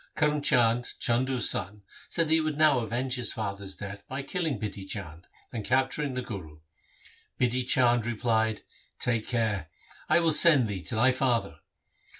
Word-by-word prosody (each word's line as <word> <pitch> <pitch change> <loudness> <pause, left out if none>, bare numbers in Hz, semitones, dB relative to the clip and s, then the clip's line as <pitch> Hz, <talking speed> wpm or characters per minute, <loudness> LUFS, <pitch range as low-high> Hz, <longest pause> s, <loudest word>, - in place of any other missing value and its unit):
Karm 150 -1 +1
Chand, 120 -4 +2
Chandu's 125 +1 +1
son, 105 -3 -1 0.3
said 165 -2 +1
that 155 - +2
he 160 - +4
would 155 -2 -2
now 155 -4 +5
avenge 120 +3 -2
his 125 - -1
father's 100 -3 -5
death 100 0 -8
by 135 +1 -4
killing 160 - -2
Bidhi 100 -2 -6
Chand 85 -5 -7 0.3
and 115 -3 -4
capturing 130 +3 0
the 125 - -3
Guru. 80 -10 -9 0.8
Bidhi 125 0 +1
Chand 120 -3 +3
replied, 110 -2 0 0.2
' - - -32
Take 115 -3 -1
care! 105 -9 -1 0.4
I - - +5
will 165 -2 +2
send 150 -6 +6
thee 100 -3 -5
to - - -1
thy 125 +4 +4
father.' 125 -2 -1
120 Hz, 165 wpm, -27 LUFS, 105-135 Hz, 0.8 s, send